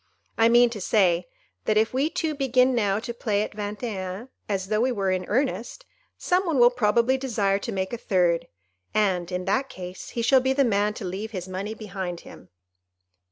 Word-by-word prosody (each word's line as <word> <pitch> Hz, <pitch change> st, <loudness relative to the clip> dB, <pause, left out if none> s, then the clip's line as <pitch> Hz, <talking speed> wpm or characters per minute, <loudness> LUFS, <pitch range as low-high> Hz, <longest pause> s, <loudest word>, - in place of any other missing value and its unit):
I 225 Hz, 0 st, +4 dB
mean 240 Hz, 0 st, +5 dB
to 210 Hz, -4 st, -6 dB
say, 180 Hz, -4 st, +2 dB, 0.4 s
that 215 Hz, -, +2 dB
if 220 Hz, +2 st, +2 dB
we 275 Hz, +4 st, +1 dB
two 320 Hz, -1 st, -2 dB
begin 260 Hz, -2 st, +2 dB
now 205 Hz, -5 st, +1 dB
to 235 Hz, +2 st, -5 dB
play 210 Hz, -3 st, 0 dB
at -, -, -5 dB
Vingt 210 Hz, +2 st, -5 dB
et 205 Hz, -6 st, -3 dB
un 220 Hz, +8 st, -8 dB, 0.2 s
as 190 Hz, -1 st, -2 dB
though 215 Hz, 0 st, +1 dB
we 255 Hz, +2 st, +2 dB
were 195 Hz, -5 st, 0 dB
in 185 Hz, -1 st, -1 dB
earnest, 260 Hz, -, -2 dB, 0.3 s
some 365 Hz, +1 st, +1 dB
one 320 Hz, -4 st, +1 dB
will 240 Hz, 0 st, +7 dB
probably 240 Hz, +2 st, +2 dB
desire 205 Hz, -7 st, 0 dB
to 230 Hz, -, -5 dB
make 190 Hz, +1 st, -3 dB
a 240 Hz, -, -3 dB
third, 175 Hz, -6 st, +1 dB, 0.5 s
and, 190 Hz, -5 st, +1 dB
in 180 Hz, 0 st, -3 dB
that 270 Hz, +1 st, 0 dB
case, 180 Hz, 0 st, -8 dB
he 235 Hz, -, 0 dB
shall 260 Hz, +2 st, +5 dB
be 265 Hz, +1 st, +1 dB
the 275 Hz, 0 st, +3 dB
man 210 Hz, -1 st, +1 dB
to 200 Hz, -, -6 dB
leave 195 Hz, +4 st, -4 dB
his 180 Hz, 0 st, -5 dB
money 195 Hz, +4 st, -4 dB
behind 190 Hz, -5 st, -5 dB
him." -, -, -14 dB
215 Hz, 205 wpm, -25 LUFS, 190-245 Hz, 0.5 s, will